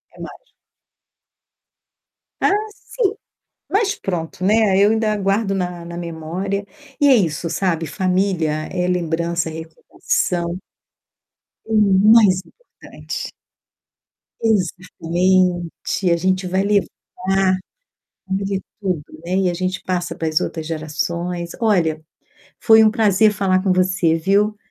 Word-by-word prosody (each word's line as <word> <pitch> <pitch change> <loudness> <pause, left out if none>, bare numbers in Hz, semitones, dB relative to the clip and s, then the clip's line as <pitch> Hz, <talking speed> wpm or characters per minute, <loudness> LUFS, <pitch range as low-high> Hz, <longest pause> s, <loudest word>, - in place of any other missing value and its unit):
É - - -17
mágico. - - -11 1.9
Ah, - - +3 0.2
sim. 425 -3 -2 0.6
Mas 405 0 +1
pronto, 175 -2 -4
né, 210 -1 +3
eu 200 +1 +5
ainda 220 -1 +1
guardo 195 +1 0
na 180 -2 -3
na 170 0 -8
memória. 175 +4 -4 0.4
E 290 - +5
é 270 - +7
isso, 165 - 0
sabe, 170 -4 -1
família 185 0 0 0.2
é 180 -1 -1
lembrança, 170 -1 -1
é - - -8
recordação. 170 +2 -3 1.1
O 225 - -5 0.4
mais 205 -5 +6
importante. - - -9 1.1
Exatamente, 180 -3 0
e - - +4
a 170 - +3
gente 185 +2 0
vai 190 +2 0
levar 200 -1 +2 1.4
família 195 +1 -1
é - - -7 0.2
tudo, 180 -6 -2 0.2
né, 180 +2 -1
e 190 -1 +2
a - - -2
gente 185 +1 -3
passa 180 -1 -2
para 165 - -3
as 155 0 +1
outras 160 -2 -4
gerações. 170 +2 -3
Olha, 170 -8 +1 0.6
foi 220 -1 +6
um 215 - +5
prazer 215 -2 +3
falar 190 -2 +1
com 190 -1 +2
você, 185 -2 +2
viu. 200 +5 +1
185 Hz, 125 wpm, -20 LUFS, 170-200 Hz, 1.9 s, é